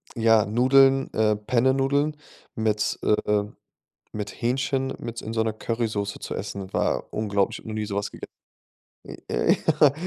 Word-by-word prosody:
ja, 115 -2 +4
Nudeln, 135 +4 +4
äh, 110 -1 +2
Pennenudeln 135 +7 +1 0.4
mit, 110 -1 0
äh 105 -1 +2 0.7
mit 105 -2 -4
Hähnchen 130 +2 0
mit 115 0 -6
in 110 - -6
so 110 - +1
'ner 110 -1 -1
Currysauce 110 -3 -2
zu - - -5
essen. 100 -1 -6
War - - 0
unglaublich, 100 -2 0
habe - - -10
noch 110 - -4
nie 110 -1 -2
so 100 -1 -5
was 100 - -2
gege - - -9 0.8
Äh, - - -8
äh, - - +3 0.3
ja, 145 -2 +7
110 Hz, 155 wpm, -25 LUFS, 105-130 Hz, 0.8 s, ja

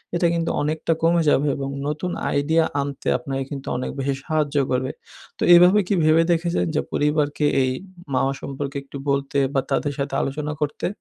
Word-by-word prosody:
এটা 170 0 +3
কিন্তু 165 -1 0
অনেকটা 155 +2 0
কমে 170 +1 +4
যাবে 145 0 +3
এবং 135 -1 -3 0.2
নতুন 150 +4 -2 0.2
আইডিয়া 160 +3 +2 0.2
আনতে 140 -1 -5
আপনাকে 135 -3 -4
কিন্তু 140 -1 -6
অনেক 125 - -3
বেশি 135 +1 0
সাহায্যও 150 -3 0
করবে। 130 +1 0 0.5
তো - - -1
এভাবে 180 +4 +7
কি - - +1
ভেবে 155 +1 +5
দেখেছেন 170 +1 +1
যে, - - +2
পরিবারকে 150 0 +1 0.2
এই 130 - +1 0.4
মাওয়া 135 +1 +1
সম্পর্কে 140 0 -5
একটু 140 0 -9
বলতে 140 0 0 0.2
বা 135 - +2
তাদের 145 +1 0
সাথে 140 0 -2
আলোচনা 150 +2 -3
করতে? 145 - -2
145 Hz, 175 wpm, -22 LUFS, 140-160 Hz, 0.5 s, এভাবে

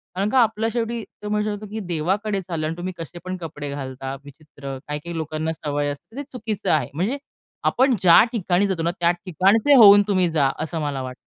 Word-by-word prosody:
कारण 200 +3 0
का 260 - +3
आपल्या 225 0 +1
शेवटी 235 -1 -2 0.2
तो 210 - -4
म्हणू 210 0 0
शकतो, 210 0 -4
की 220 - -4
देवाकडे 195 +3 -1
चालला 165 -4 -3
आणि 160 - -3
तुम्ही 185 +1 -4
कसे 165 +1 -7
पण 185 0 -3
कपडे 150 -4 -7
घालता 135 -1 -5
विचित्र. 140 -2 -9
काही 150 0 -3
काही 170 +2 -7
लोकांना 155 0 -2
सवय 145 -2 -2
असते 145 - -9
तर 285 - -4
ते - - -6
चुकीचं 215 -6 -4
आहे. 155 - +1
म्हणजे 200 - -1 0.5
आपण 260 0 +3
ज्या 175 +1 +8
ठिकाणी 195 -3 +1
जातो 175 -4 -2
ना, 170 - +1
त्या 170 0 +4
ठिकाणचे 190 - +2
होऊन 205 -4 +9
तुम्ही 185 -4 +2
जा. 145 -4 +2
असं 160 0 -4
मला 140 -3 -2
वाटतं. 130 0 -6
175 Hz, 210 wpm, -22 LUFS, 155-210 Hz, 0.5 s, होऊन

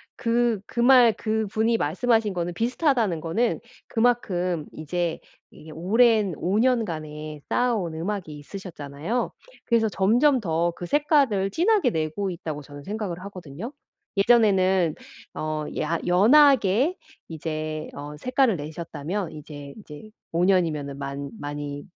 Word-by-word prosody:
그 235 -2 +1
그 - - -6
말 245 -2 +7
그분이 220 +1 0
말씀하신 220 - +1
거는 175 0 -2
비슷하다는 235 - +1
거는 215 +10 0 0.3
그만큼 185 -9 0
이제 170 +2 -2 0.3
이게 155 - -13
오랜 210 +3 +3
5 195 +4 0
년간에 155 -11 -1
쌓아온 220 -10 0
음악이 170 -2 -4
있으셨잖아요. 160 - -4 0.3
그래서 230 -2 +2
점점 240 +9 +3
더 170 -4 0
그 175 - -6
색깔을 280 - +2
진하게 365 - +2
내고 160 +2 -2
있다고 160 -4 -5
저는 145 0 -11
생각을 200 -2 -4
하거든요. 185 - -8 0.4
예전에는 190 -6 +4 0.4
어 155 -1 -3 0.2
야 165 +2 0
연하게 245 - +5 0.3
이제 155 -1 -4
어 145 +1 -7
색깔을 255 - +2
내셨다면 160 +4 -5
이제 145 -2 -9
이제 200 +2 -12 0.2
5 170 +2 +2
년이면은 155 -7 +1
많 140 0 -5
많이 145 0 -5
185 Hz, 275 characters per minute, -25 LUFS, 155-230 Hz, 0.4 s, 말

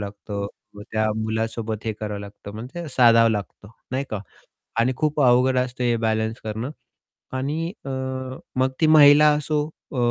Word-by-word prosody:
लागतं. 100 0 -5 0.3
मग 105 - -9
त्या 110 0 +1 0.2
मुलासोबत 110 0 -3
हे 110 - -1
करावं 105 -1 -4
लागतं, 100 0 -10
म्हणजे 130 +9 -7
साधावं 115 -4 +5
लागतं, 105 -1 -5 0.2
नाही 135 +2 -1
का? 105 -3 -3 0.6
आणि 125 +3 +2
खूप 150 -1 0
अवघड 125 0 +4
असतं 125 0 -1
हे 120 -1 +2
बॅलन्स 110 0 -1
करणं. 110 +5 -4 0.6
आणि 150 +6 -2
अ, - - -6 0.7
मग 130 +1 +2
ती 160 - +5
महिला 150 -1 +8
असो 150 0 -1 0.2
अ, - - -5
120 Hz, 155 wpm, -23 LUFS, 110-140 Hz, 0.7 s, महिला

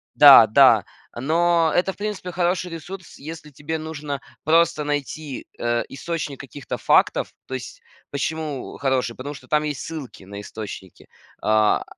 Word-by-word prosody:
да, - - +10
да, - - +6 0.3
но 165 +4 +2
это, 185 +2 +2
в - - -25
принципе, 205 -3 -4
хороший 180 0 0
ресурс, 175 +2 -9
если 150 +1 -9
тебе 150 +4 -4
нужно 150 -3 -5 0.2
просто 165 0 +3
найти, 145 -1 -4
э, 120 0 0
источник 150 -1 -4
каких-то 140 0 -7
фактов. - - +2
То 130 - -8
есть 130 -1 -6 0.3
почему, 150 -1 -3
э, - - -12
хороший? 130 -3 0
Потому 145 +3 -6
что 130 - -14
там 150 +2 +2
есть 150 -3 -3
ссылки 150 -11 -7
на 100 +1 -8
источники, 105 -4 -9 0.3
а, 110 0 +3
150 Hz, 150 wpm, -23 LUFS, 130-165 Hz, 0.3 s, да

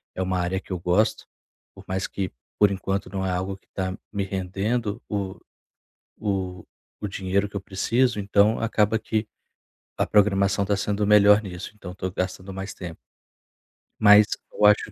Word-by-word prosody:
é 95 - -3
uma 95 -1 -1
área 90 +2 -1
que 95 - -15
eu 90 - -2
gosto. 95 +6 +1 0.5
Por - - -12
mais 95 +1 -2
que 95 -3 -4 0.3
por 105 -1 +5
enquanto 95 +1 -2
não 95 -1 -2
é - - 0
algo 95 +2 -2
que - - -37
tá 95 -1 -2 0.2
me 100 -1 -1
rendendo 100 +4 -2
o 100 -2 -3 0.8
o 95 -3 -3 0.4
o 105 - -2
dinheiro 100 +1 -1
que 105 - -16
eu - - -2
preciso, 115 +5 +1
então 105 +2 +3
acaba 110 -1 +2
que 110 0 -2 0.7
a - - +2
programação 100 -1 +3
tá 100 0 +1
sendo 105 +1 -1
melhor 105 0 +6
nisso, 90 -2 -7
então 95 -4 -9
eu - - -9
tô 95 - -3
gastando 95 +1 -4
mais 95 +1 -5
tempo. 85 -3 -8 1.0
Mas 105 0 +8 0.3
eu 105 - +1
acho 105 +1 +5
100 Hz, 175 wpm, -25 LUFS, 95-105 Hz, 1.0 s, Mas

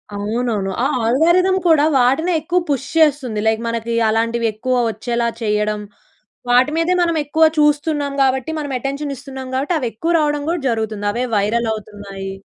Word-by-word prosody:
అవునవును. 210 -1 -2
ఆ - - +4 0.2
ఆల్గోరిథం 345 +10 +3
కూడా 315 -3 +5
వాటినే 270 +8 +2
ఎక్కువ 350 +4 0
పుష్ 280 -1 -1
చేస్తుంది. 280 -8 +2
లైక్ 220 0 +1
మనకి 230 0 -3 0.2
అలాంటివి 230 +1 0
ఎక్కువ 255 +4 -2
వచ్చేలా 235 +2 -2
చేయడం. 210 -1 0 0.7
వాటి 250 +4 +4
మీదే 330 +2 +2
మనం 335 -1 +1
ఎక్కువ 315 +3 +1 0.2
చూస్తున్నాం 295 -1 +1
కాబట్టి 265 +2 0
మనం 290 -2 -5
అటెన్షన్ 275 +2 -3
ఇస్తున్నాం 265 0 -8
కాబట్టి. 285 +7 0
అవెక్కువ 255 +6 -2
రావడం 295 -1 0
కూడా 340 -1 -1
జరుగుతుంది. 220 -3 -2
అవే 245 +3 -1
వైరల్ 220 +3 +1
అవుతున్నాయి. 200 -2 -8
255 Hz, 150 wpm, -19 LUFS, 220-295 Hz, 0.7 s, కూడా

